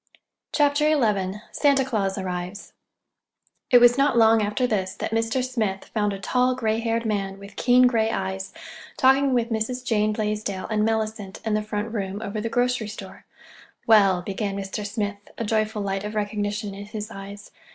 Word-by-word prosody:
CHAPTER 290 0 +3
XI 200 -4 0
SANTA 280 -2 +3
CLAUS 205 -6 -1
ARRIVES 185 +1 -5 1.0
It 250 - +7
was 245 +1 +6
not 275 -3 +3
long 225 -1 +6
after 210 +5 0
this 195 -5 -1
that - - -4
Mr. 225 +3 0
Smith 220 -7 -2
found 210 -2 +1
a 195 - -4
tall, 250 +6 +1
gray 225 -3 0
haired 230 0 -1
man, 195 -3 -2
with 200 +1 -12
keen 250 0 +5
gray 225 -3 +2
eyes, 190 -2 -3 0.5
talking 270 0 +4
with 240 -2 +1
Mrs. 245 +3 -2
Jane 215 -2 +2
Blaisdell 210 -2 -2
and 215 -1 +2
Mellicent 220 -3 -2
in 220 - 0
the 215 - +1
front 210 +1 -4
room 200 -2 -3
over 210 0 -4
the 230 - -2
grocery 245 -1 0
store. 215 - -10 0.6
"Well—" 195 -5 +5
began 200 +1 -3
Mr. 200 +1 -4
Smith, 205 -1 -3 0.2
a 230 - -2
joyful 215 0 0
light 195 0 -2
of 210 +1 -5
recognition 205 0 -2
in 200 +1 -8
his 215 0 -6
eyes. 200 0 -9
215 Hz, 170 wpm, -24 LUFS, 200-230 Hz, 1.0 s, It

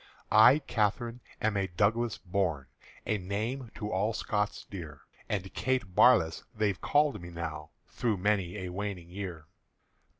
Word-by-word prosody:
I 115 +6 +8
Catherine 120 -2 -1 0.2
am 110 -1 +2
a 95 -1 +1
Douglas 105 +5 +1
born, 90 -7 -1 0.4
A 105 - 0
name 110 +7 -3
to 105 -1 -4
all 100 +5 +1
Scots 105 -1 -2
dear; 80 -7 -8 0.3
And 95 -2 -2
Kate 125 -8 -1
Barlass 90 -8 +5
they've 105 -4 0
called 145 -6 +2
me 85 - -8
now 80 -2 -5 0.2
Through 115 -4 -1
many 95 -1 0
a - - -4
waning 90 -2 -5
year. 90 -5 -6
100 Hz, 140 wpm, -30 LUFS, 90-110 Hz, 0.4 s, I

